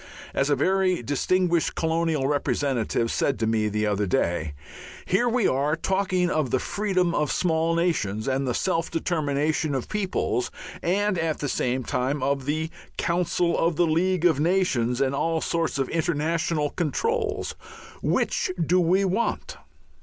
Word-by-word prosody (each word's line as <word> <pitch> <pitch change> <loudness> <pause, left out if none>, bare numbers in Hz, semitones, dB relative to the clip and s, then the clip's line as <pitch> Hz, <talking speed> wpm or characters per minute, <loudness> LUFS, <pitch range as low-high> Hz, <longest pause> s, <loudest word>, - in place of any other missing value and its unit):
As 140 - +1
a 145 - +4
very 185 +1 +1
distinguished 170 +6 +1
colonial 160 -3 0
representative 135 -5 0
said 140 - 0
to 115 - 0
me 110 -1 +1
the 105 +1 -1
other 105 -1 0
day: 85 -4 0 0.5
"Here 240 +7 +2
we 235 -2 +2
are 140 +4 +1
talking 185 +1 0
of 155 -6 0
the 130 - +2
freedom 185 +1 0
of 150 -3 0
small 165 -1 +1
nations 125 - 0
and 135 0 0
the 125 - 0
'self 165 -3 0
determination' 155 -2 0
of 130 - -3
peoples, 190 -11 -1 0.3
and 195 +1 +1
at 160 -2 0
the 145 - -3
same 130 -1 -1
time 130 +4 -1
of 135 -1 0
the 160 +2 -1 0.3
Council 170 0 +1
of 165 0 +1
the 175 - +3
League 175 +2 +1
of 160 -5 +4
Nations 145 -8 +1
and 135 0 +1
all 160 +3 0
sorts 165 -1 -1
of 135 -1 0
international 160 -2 0
controls. 425 - -1 0.5
Which - - 0
do 170 +3 +3
we 185 +3 +3
want?" 195 +5 -1
160 Hz, 155 wpm, -25 LUFS, 135-180 Hz, 0.5 s, a